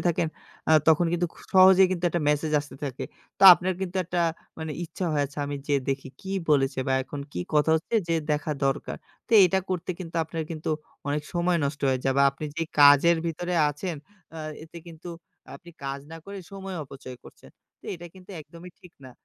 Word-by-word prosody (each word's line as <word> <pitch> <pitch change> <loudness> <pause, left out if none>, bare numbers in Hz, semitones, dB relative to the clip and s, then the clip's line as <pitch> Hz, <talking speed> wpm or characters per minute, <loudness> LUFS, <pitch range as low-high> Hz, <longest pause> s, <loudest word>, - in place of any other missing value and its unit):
থাকেন 165 -1 0 0.4
আ - - +6 0.2
তখন 160 +2 +5
কিন্তু 175 0 +1
খুব - - -16
সহজেই 190 0 +8
কিন্তু 180 -1 -3
একটা 175 - -1
message 150 +1 +1
আসতে 145 - -11
থাকে। 135 -3 -4 0.3
তো - - -4
আপনার 185 +2 -2
কিন্তু 190 -1 -4
একটা 175 +1 -2 0.4
মানে 160 -1 -4
ইচ্ছা 170 +3 -5
হয় 145 - +1
আচ্ছা 140 +2 -11
আমি 145 0 -4
যেয়ে 145 -2 +2
দেখি 135 0 -3
কী 190 - -8 0.2
বলেছে? 135 -2 +2
বা - - +2
এখন 140 +2 -7
কি - - -3
কথা 150 +1 +3
হচ্ছে 160 +8 -5
যে 165 - +2 0.2
দেখা 150 +1 -1
দরকার? 135 +1 -1 0.3
তো - - -9
এটা 185 +1 +2
করতে 180 -1 -2
কিন্তু 170 -2 -7
আপনার 160 0 -4
কিন্তু 160 -1 -5 0.4
অনেক 145 +1 -1
সময় 175 0 +2
নষ্ট 140 +1 -3
হয়ে 130 -1 +1
যায় 135 -1 +1
বা - - +6
আপনি 140 +3 -8
যে 165 - -1 0.2
কাজের 145 +4 +7
ভিতরে 175 +2 -3
আছেন 155 +4 -4 0.4
আ - - -7 0.2
এতে 165 +1 -11
কিন্তু 165 +1 -11 0.4
আ - - -12
আপনি 175 - -15
কাজ 135 0 -4
না - - -7
করে 200 0 -8
সময় 195 -1 -6
অপচয় 135 -2 -10
করছেন। - - -16 0.3
তো - - -26
এটা 175 0 -9
কিন্তু 185 0 -15
একদমই 170 +3 -12
ঠিক 180 - -16
না, 130 - -10
160 Hz, 205 wpm, -26 LUFS, 145-175 Hz, 0.4 s, সহজেই